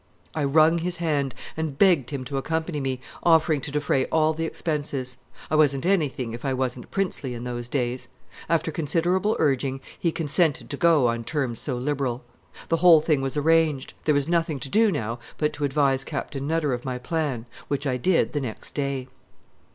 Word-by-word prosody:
I 155 Hz, -2 st, 0 dB
wrung 155 Hz, +4 st, +4 dB
his 175 Hz, +1 st, -3 dB
hand 145 Hz, -5 st, -1 dB, 0.2 s
and 160 Hz, -3 st, -3 dB
begged 175 Hz, -10 st, +4 dB
him 140 Hz, -3 st, -4 dB
to 135 Hz, +2 st, -3 dB
accompany 160 Hz, +2 st, -2 dB
me, 130 Hz, -2 st, -2 dB, 0.2 s
offering 160 Hz, -3 st, +4 dB
to 140 Hz, -, -5 dB
defray 145 Hz, -2 st, +1 dB
all 155 Hz, 0 st, +2 dB
the 165 Hz, +1 st, -2 dB
expenses. 145 Hz, -6 st, -3 dB, 0.3 s
I -, -, +3 dB
wasn't 145 Hz, -2 st, +3 dB
anything 145 Hz, -11 st, 0 dB
if 120 Hz, -, -7 dB
I 135 Hz, -2 st, 0 dB
wasn't 130 Hz, -1 st, -3 dB
princely 165 Hz, -10 st, -2 dB
in 120 Hz, -, -6 dB
those 120 Hz, -1 st, -4 dB
days. 125 Hz, -1 st, -2 dB, 0.4 s
After 165 Hz, -1 st, +1 dB
considerable 175 Hz, +6 st, +1 dB
urging, 135 Hz, -2 st, +1 dB, 0.2 s
he 170 Hz, -, +1 dB
consented 160 Hz, -1 st, +1 dB
to -, -, -1 dB
go 165 Hz, -5 st, +4 dB
on 115 Hz, 0 st, -1 dB
terms 130 Hz, -3 st, -2 dB
so 130 Hz, -4 st, -2 dB
liberal. 130 Hz, -2 st, -2 dB, 0.5 s
The 165 Hz, -, +3 dB
whole 165 Hz, -2 st, +7 dB
thing 150 Hz, -3 st, +1 dB
was 135 Hz, +2 st, -2 dB
arranged; 155 Hz, -2 st, +2 dB
there 150 Hz, -, +3 dB
was 140 Hz, 0 st, +1 dB
nothing 165 Hz, -4 st, 0 dB
to 140 Hz, -, -2 dB
do 220 Hz, +3 st, +4 dB
now 115 Hz, -, -3 dB, 0.2 s
but 150 Hz, -1 st, 0 dB
to 145 Hz, -, -2 dB
advise 135 Hz, -1 st, +2 dB
Captain 135 Hz, 0 st, -4 dB
Nutter 155 Hz, -3 st, +1 dB
of 120 Hz, 0 st, -4 dB
my 130 Hz, -1 st, -3 dB
plan, 135 Hz, -3 st, -2 dB, 0.2 s
which 140 Hz, +1 st, -2 dB
I 130 Hz, -2 st, 0 dB
did 175 Hz, +7 st, +2 dB
the 145 Hz, -, -2 dB
next 115 Hz, -5 st, -6 dB
day. 140 Hz, -3 st, -2 dB
145 Hz, 190 wpm, -25 LUFS, 130-160 Hz, 0.5 s, whole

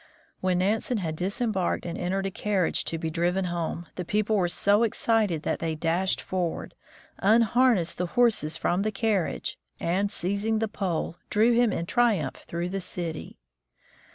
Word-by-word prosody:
When 185 Hz, -1 st, +1 dB
Nansen 215 Hz, +6 st, +1 dB
had 165 Hz, -6 st, -2 dB
disembarked 190 Hz, +2 st, -1 dB
and 170 Hz, -1 st, -4 dB
entered 190 Hz, +2 st, -1 dB
a 195 Hz, -, -2 dB
carriage 195 Hz, -2 st, 0 dB
to 165 Hz, -, -2 dB
be 160 Hz, 0 st, -3 dB
driven 175 Hz, +3 st, 0 dB
home, 170 Hz, -1 st, -3 dB
the 180 Hz, -, -2 dB
people 210 Hz, +4 st, +1 dB
were 185 Hz, -4 st, +2 dB
so 205 Hz, +4 st, +3 dB
excited 215 Hz, -7 st, +1 dB
that -, -, -1 dB
they 165 Hz, -1 st, -2 dB
dashed 170 Hz, +4 st, 0 dB
forward, 180 Hz, -3 st, -3 dB, 0.5 s
unharnessed 225 Hz, -3 st, +3 dB
the 180 Hz, -, 0 dB
horses 205 Hz, -10 st, +3 dB
from 180 Hz, +2 st, +1 dB
the 215 Hz, +1 st, 0 dB
carriage, 205 Hz, -4 st, -1 dB, 0.2 s
and 190 Hz, +4 st, 0 dB
seizing 200 Hz, +3 st, -1 dB
the 225 Hz, 0 st, 0 dB
pole, 180 Hz, -5 st, -2 dB
drew 220 Hz, +3 st, +4 dB
him 235 Hz, -1 st, +4 dB
in 170 Hz, -, -2 dB
triumph 215 Hz, -, +1 dB
through 170 Hz, +1 st, -3 dB
the 195 Hz, +1 st, -3 dB
city. 170 Hz, -3 st, -5 dB
190 Hz, 160 wpm, -27 LUFS, 170-215 Hz, 0.5 s, drew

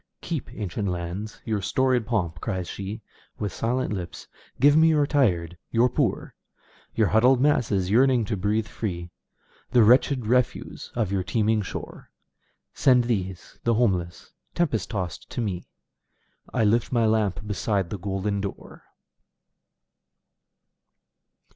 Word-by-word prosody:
"Keep, 165 Hz, -5 st, -4 dB
ancient 100 Hz, 0 st, -3 dB
lands, 90 Hz, +4 st, -4 dB
your 110 Hz, -2 st, -1 dB
storied 125 Hz, +3 st, +1 dB
pomp!" 90 Hz, -8 st, -1 dB
cries 90 Hz, -2 st, -3 dB
sheWith 100 Hz, +1 st, -7 dB
silent 125 Hz, 0 st, -1 dB
lips. 90 Hz, -4 st, -6 dB, 0.3 s
"Give 145 Hz, +1 st, +6 dB
me 160 Hz, +1 st, +6 dB
your 150 Hz, -2 st, +4 dB
tired, 90 Hz, -, +1 dB
your 120 Hz, +2 st, +3 dB
poor, -, -, -1 dB, 0.6 s
Your 110 Hz, -4 st, +3 dB
huddled 125 Hz, +4 st, +4 dB
masses 105 Hz, -9 st, +2 dB
yearning 125 Hz, 0 st, +4 dB
to 105 Hz, -, -2 dB
breathe 105 Hz, +3 st, 0 dB
free, 85 Hz, -5 st, -5 dB, 0.6 s
The 120 Hz, -, +5 dB
wretched 125 Hz, +2 st, +4 dB
refuse 125 Hz, +2 st, -1 dB
of 110 Hz, -5 st, 0 dB
your 100 Hz, -1 st, +1 dB
teeming 110 Hz, +2 st, +1 dB
shore. 95 Hz, -, -7 dB, 0.6 s
Send 125 Hz, -3 st, +4 dB
these, 95 Hz, -6 st, -3 dB
the 115 Hz, -1 st, +2 dB
homeless, 90 Hz, -7 st, -1 dB, 0.2 s
tempest 130 Hz, -, 0 dB
tost 90 Hz, -5 st, -4 dB
to -, -, -5 dB
me,I 100 Hz, +2 st, -7 dB
lift 110 Hz, +2 st, +2 dB
my 120 Hz, -3 st, +2 dB
lamp 105 Hz, -3 st, +1 dB
beside 100 Hz, -3 st, -1 dB
the 105 Hz, -, -4 dB
golden 100 Hz, +1 st, -2 dB
door!" 100 Hz, -1 st, -8 dB
105 Hz, 125 wpm, -25 LUFS, 95-120 Hz, 0.6 s, Give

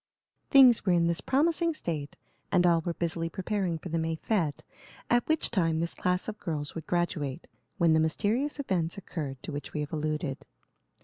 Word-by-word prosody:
Things 260 Hz, -5 st, +7 dB
were 185 Hz, -, +3 dB
in 170 Hz, -1 st, +3 dB
this 170 Hz, 0 st, 0 dB
promising 330 Hz, +4 st, +2 dB
state, 155 Hz, -, -4 dB, 0.3 s
and 180 Hz, -2 st, +4 dB
all 170 Hz, -2 st, +4 dB
were 170 Hz, 0 st, -3 dB
busily 165 Hz, -1 st, -1 dB
preparing 190 Hz, -1 st, -2 dB
for 175 Hz, -, -8 dB
the 165 Hz, +1 st, 0 dB
May 160 Hz, 0 st, -1 dB
fête, 165 Hz, -4 st, -1 dB, 0.5 s
at 240 Hz, 0 st, +3 dB
which 315 Hz, 0 st, +1 dB
time 165 Hz, -7 st, +1 dB
this 170 Hz, 0 st, -1 dB
class 180 Hz, 0 st, -1 dB
of 220 Hz, -1 st, -5 dB
girls 150 Hz, -4 st, -3 dB
would 165 Hz, -, -7 dB
graduate, 170 Hz, -5 st, -1 dB, 0.3 s
when 170 Hz, -2 st, +4 dB
the 160 Hz, -, +4 dB
mysterious 220 Hz, -, 0 dB
events 180 Hz, -11 st, -1 dB
occurred 150 Hz, -8 st, -6 dB
to -, -, -5 dB
which 145 Hz, 0 st, -6 dB
we 150 Hz, -, -2 dB
have 150 Hz, +2 st, -5 dB
alluded. 155 Hz, -2 st, -3 dB
170 Hz, 185 wpm, -29 LUFS, 160-200 Hz, 0.5 s, Things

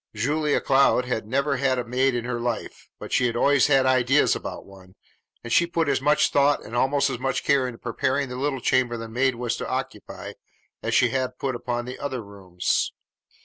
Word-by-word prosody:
Julia 145 Hz, +7 st, +1 dB
Cloud 135 Hz, -2 st, +3 dB
had 110 Hz, -4 st, -3 dB
never 140 Hz, +5 st, 0 dB
had 135 Hz, -2 st, +1 dB
a 125 Hz, -, -1 dB
maid 130 Hz, +2 st, +1 dB
in 120 Hz, -1 st, -3 dB
her 120 Hz, -1 st, -3 dB
life, 120 Hz, -1 st, -4 dB
but -, -, -9 dB
she 125 Hz, -, +3 dB
had 115 Hz, -, -3 dB
always 140 Hz, +1 st, +3 dB
had 135 Hz, -2 st, +4 dB
ideas 130 Hz, +2 st, +3 dB
about -, -, -7 dB
one, 95 Hz, -1 st, -16 dB, 0.5 s
and 115 Hz, -, -3 dB
she 170 Hz, -, +4 dB
put 165 Hz, -2 st, -1 dB
as 140 Hz, -2 st, +1 dB
much 150 Hz, +2 st, +3 dB
thought 140 Hz, 0 st, +3 dB
and 115 Hz, -, -8 dB
almost 140 Hz, +2 st, +2 dB
as 125 Hz, -, -4 dB
much 135 Hz, +1 st, -1 dB
care 135 Hz, -2 st, +2 dB
into 120 Hz, -2 st, -7 dB
preparing 130 Hz, +4 st, -1 dB
the 125 Hz, -, -7 dB
little 135 Hz, 0 st, -2 dB
chamber 125 Hz, -1 st, +1 dB
the 115 Hz, 0 st, -6 dB
maid 125 Hz, +3 st, 0 dB
was 120 Hz, 0 st, -2 dB
to -, -, -5 dB
occupy -, -, -5 dB, 0.5 s
as -, -, -1 dB
she 120 Hz, -, +4 dB
had 130 Hz, 0 st, -2 dB
put 135 Hz, -1 st, -2 dB
upon 120 Hz, 0 st, -3 dB
the 125 Hz, +1 st, -7 dB
other 130 Hz, -4 st, -4 dB
rooms. 95 Hz, -3 st, -2 dB
130 Hz, 210 wpm, -24 LUFS, 120-140 Hz, 0.5 s, had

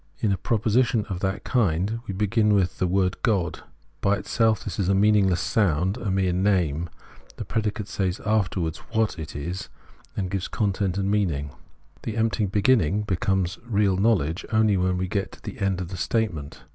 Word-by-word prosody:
In 110 Hz, -, 0 dB
a 95 Hz, -, +1 dB
proposition 115 Hz, +4 st, +1 dB
of 95 Hz, -3 st, -3 dB
that 95 Hz, +1 st, -2 dB
kind 105 Hz, -2 st, +1 dB
we 95 Hz, -, -3 dB
begin 105 Hz, +1 st, +2 dB
with 95 Hz, -2 st, 0 dB
the 90 Hz, -, +2 dB
word 95 Hz, 0 st, 0 dB
God. 100 Hz, -8 st, 0 dB, 0.4 s
By 100 Hz, +1 st, +3 dB
itself 110 Hz, +1 st, +1 dB
this 100 Hz, -2 st, -5 dB
is 95 Hz, -2 st, +1 dB
a 100 Hz, -, +4 dB
meaningless 100 Hz, -3 st, +4 dB
sound, 95 Hz, -1 st, +1 dB
a 115 Hz, -, -3 dB
mere 95 Hz, -1 st, +1 dB
name; 90 Hz, -4 st, +1 dB, 0.5 s
the -, -, -6 dB
predicate 105 Hz, -1 st, -2 dB
says 95 Hz, -3 st, -2 dB
afterwards 95 Hz, -7 st, 0 dB
wliat 110 Hz, -5 st, +1 dB
it 75 Hz, -2 st, -7 dB
is, 85 Hz, +6 st, -5 dB, 0.6 s
gives 95 Hz, -2 st, -2 dB
it -, -, -23 dB
content 100 Hz, -3 st, 0 dB
and 100 Hz, 0 st, 0 dB
meaning: 80 Hz, -9 st, 0 dB, 0.5 s
the 110 Hz, 0 st, -4 dB
empty 110 Hz, -2 st, +1 dB
beginning 105 Hz, -2 st, +2 dB
becomes 95 Hz, -2 st, 0 dB
real 105 Hz, -4 st, +1 dB
knowledge 95 Hz, -5 st, +1 dB
only 110 Hz, -2 st, +3 dB
when 90 Hz, 0 st, +1 dB
we 95 Hz, -, -1 dB
thus -, -, -8 dB
get 100 Hz, -2 st, -1 dB
to -, -, -14 dB
the -, -, -7 dB
end 95 Hz, -2 st, 0 dB
of 90 Hz, -2 st, -4 dB
the 95 Hz, -, -6 dB
statement. 90 Hz, -9 st, -2 dB
100 Hz, 185 wpm, -25 LUFS, 90-105 Hz, 0.6 s, a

